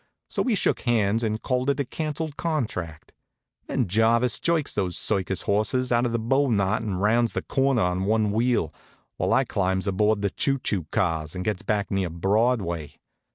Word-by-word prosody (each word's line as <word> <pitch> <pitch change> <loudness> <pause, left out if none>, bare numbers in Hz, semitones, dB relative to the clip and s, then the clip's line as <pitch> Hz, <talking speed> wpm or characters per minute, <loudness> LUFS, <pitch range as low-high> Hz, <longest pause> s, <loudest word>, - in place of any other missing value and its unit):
So - - -2
we 245 -4 +1
shook - - +1
hands 115 -3 +1
and 110 -1 -2
called 130 +1 0
it 140 0 0
a 140 - 0
canceled 155 +2 -4
contract. 105 - -3 0.6
Then 125 -6 0
Jarvis 115 +5 +3
jerks 165 -4 +1
those 90 -4 -2
circus 95 -1 -1
horses 110 +5 0
out 120 +1 +3
of 115 - -2
a - - +3
bow 135 +5 +1
knot 100 -2 +1
and 100 -5 -3
rounds 115 +3 +2
the - - -2
corner 135 -3 +1
on 90 +1 0
one 110 0 +2
wheel, 115 -8 +1 0.4
while - - 0
I - - +4
climbs 95 0 -1
aboard 105 +2 +1
the 100 - +1
choo 135 +6 0
choo 95 - -2
cars 80 -3 -1
and 90 0 -4
gets 105 -4 -1
back 105 -1 -1
near 95 -3 0
Broadway. 95 - 0
110 Hz, 185 wpm, -25 LUFS, 95-125 Hz, 0.6 s, I